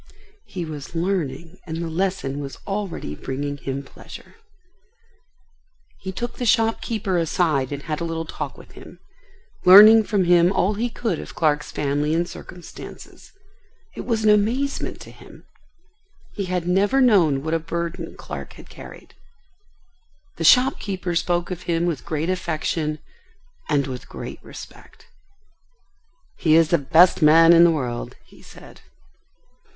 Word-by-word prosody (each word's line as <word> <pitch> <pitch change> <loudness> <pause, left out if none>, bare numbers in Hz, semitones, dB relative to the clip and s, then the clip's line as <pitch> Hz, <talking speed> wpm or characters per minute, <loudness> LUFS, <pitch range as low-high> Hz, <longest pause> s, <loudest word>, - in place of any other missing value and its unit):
He 180 -4 -5
was 150 0 -8
learning 170 -2 -3
and 160 0 -4
the 170 0 -3
lesson 165 -5 -2
was 140 -1 -7
already 195 - -4
bringing 140 - -5
him 135 0 -5
pleasure. - - -13 1.7
He 190 - -6
took 240 +6 -5
the 245 - -3
shopkeeper 225 -4 +1
aside 155 -5 0
and 145 0 -5
had 155 +1 -4
a - - -1
little 165 -1 -3
talk 150 -3 -6
with - - -15
him, - - -14 0.7
learning 215 +4 +9
from 205 -3 +1
him 175 0 +4
all 195 +1 +1
he 230 +4 -2
could 225 -7 -3
of - - -10
Clark's 150 -2 0
family 145 +2 -1
and 170 +1 0
circumstances. 175 -1 -12 0.6
It - - -7
was 225 -3 -1
an 215 - +5
amazement 235 +7 0
to - - -11
him. - - -16 0.9
He 200 - -4
had 180 -1 -3
never 200 +8 +2
known 175 - +3
what 160 +1 -2
a 165 - +1
burden 170 +1 -5
Clark - - -8
had - - -15
carried. - - -13 1.2
The - - -3
shopkeeper 200 -8 +3
spoke 175 +1 -1
of 180 0 -7
him 170 0 +1
with 165 -6 -3
great 155 +1 -2
affection 160 -3 -2 0.7
and 145 -3 +1
with 130 -2 -8
great - - -8
respect. - - -13 1.3
"He 155 -2 +3
is 165 -1 +4
the 170 - +3
best 165 +7 +4
man 165 +2 +7
in 170 0 +7
the 170 - +6
world," 125 -7 -3
he - - -19
said. - - -15
170 Hz, 145 wpm, -22 LUFS, 150-195 Hz, 1.7 s, learning